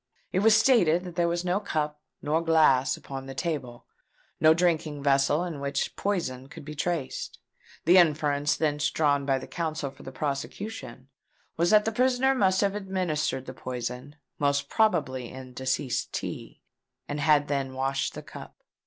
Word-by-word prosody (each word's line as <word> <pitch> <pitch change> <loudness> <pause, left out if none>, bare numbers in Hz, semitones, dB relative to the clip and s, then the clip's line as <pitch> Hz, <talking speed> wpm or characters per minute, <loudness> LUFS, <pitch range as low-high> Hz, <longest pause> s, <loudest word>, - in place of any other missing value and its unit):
It 185 - +1
was 220 +2 +6
stated 185 -8 +4
that 180 -2 -8
there 175 -1 +2
was 170 +1 -1
no 180 +2 +1
cup 150 -7 -3 0.2
nor 155 +3 +1
glass 155 -6 +3
upon 135 -1 -8
the 135 - -7
table—no 140 +1 -2
drinking 160 -4 0
vessel 140 +3 +3
in 170 -5 -5
which 140 0 -2
poison 135 -11 -2
could 140 - -11
be 150 - -6
traced. 150 -2 -3 0.5
The 180 +3 +7
inference 150 -3 +2
thence 150 -2 0
drawn 145 -3 +1
by 135 -1 +3
the 130 - -7
counsel 155 -5 -3
for - - -17
the 130 - -8
prosecution 140 +1 -5 0.5
was 170 +1 +2
that 215 -1 +5
the 225 - 0
prisoner 255 +3 +2
must 190 -7 +2
have 200 -1 +1
administered 185 -9 -2
the 130 - -7
poison—most 140 +3 -3
probably 145 - +1
in 130 -1 -10
deceased's 130 0 -1
tea, - - -6 0.4
and 145 - -3
had 145 0 +3
then 135 -2 -2
washed 135 +1 -1
the - - -7
cup. - - -11
150 Hz, 160 wpm, -27 LUFS, 135-175 Hz, 0.5 s, The